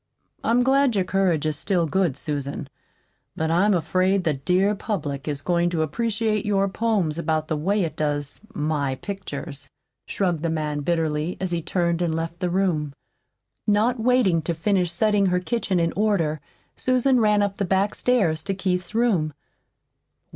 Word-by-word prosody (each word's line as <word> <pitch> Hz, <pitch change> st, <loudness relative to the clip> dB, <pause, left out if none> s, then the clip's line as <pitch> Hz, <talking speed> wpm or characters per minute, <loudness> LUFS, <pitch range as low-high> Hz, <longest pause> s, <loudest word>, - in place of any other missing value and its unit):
"I'm 240 Hz, +2 st, +3 dB
glad 270 Hz, -1 st, +3 dB
your 195 Hz, -, +2 dB
courage 180 Hz, -5 st, +1 dB
is 155 Hz, -1 st, -1 dB
still 180 Hz, -2 st, +1 dB
good, 170 Hz, -4 st, 0 dB
Susan; 140 Hz, -1 st, -4 dB, 0.7 s
but 160 Hz, 0 st, -1 dB
I'm 195 Hz, +4 st, +3 dB
afraid 185 Hz, +3 st, +1 dB
the 160 Hz, -, +1 dB
dear 180 Hz, +9 st, +1 dB
public 160 Hz, -10 st, -4 dB
is 145 Hz, -1 st, -3 dB
going 175 Hz, -1 st, +2 dB
to 165 Hz, -2 st, 0 dB
appreciate 215 Hz, +5 st, -1 dB
your 200 Hz, -2 st, +1 dB
poems 195 Hz, -7 st, 0 dB
about 155 Hz, -1 st, -1 dB
the 160 Hz, -, 0 dB
way 195 Hz, +7 st, +1 dB
it 160 Hz, -2 st, -4 dB
does 145 Hz, -2 st, -2 dB
my 150 Hz, -7 st, -1 dB
pictures," 150 Hz, -5 st, -7 dB, 0.4 s
shrugged 175 Hz, -6 st, -1 dB
the 165 Hz, -, -1 dB
man 150 Hz, -2 st, -2 dB
bitterly, 160 Hz, +1 st, -1 dB
as 185 Hz, -1 st, -2 dB
he 170 Hz, -1 st, -1 dB
turned 170 Hz, 0 st, 0 dB
and 165 Hz, -2 st, 0 dB
left 165 Hz, +1 st, -4 dB
the 180 Hz, -1 st, -1 dB
room. 170 Hz, -6 st, 0 dB, 0.7 s
Not 220 Hz, +4 st, +2 dB
waiting 225 Hz, -8 st, +3 dB
to 165 Hz, +1 st, -2 dB
finish 180 Hz, 0 st, +1 dB
setting 205 Hz, +2 st, +2 dB
her 180 Hz, 0 st, +2 dB
kitchen 195 Hz, -2 st, -1 dB
in 165 Hz, 0 st, +1 dB
order, 180 Hz, -8 st, 0 dB, 0.3 s
Susan 255 Hz, 0 st, +2 dB
ran 210 Hz, -2 st, +3 dB
up 200 Hz, -1 st, -2 dB
the -, -, 0 dB
back 195 Hz, +2 st, +1 dB
stairs 195 Hz, -11 st, +1 dB
to 195 Hz, -1 st, 0 dB
Keith's 185 Hz, +1 st, -2 dB
room. 195 Hz, -11 st, +2 dB
180 Hz, 165 wpm, -24 LUFS, 155-205 Hz, 0.7 s, I'm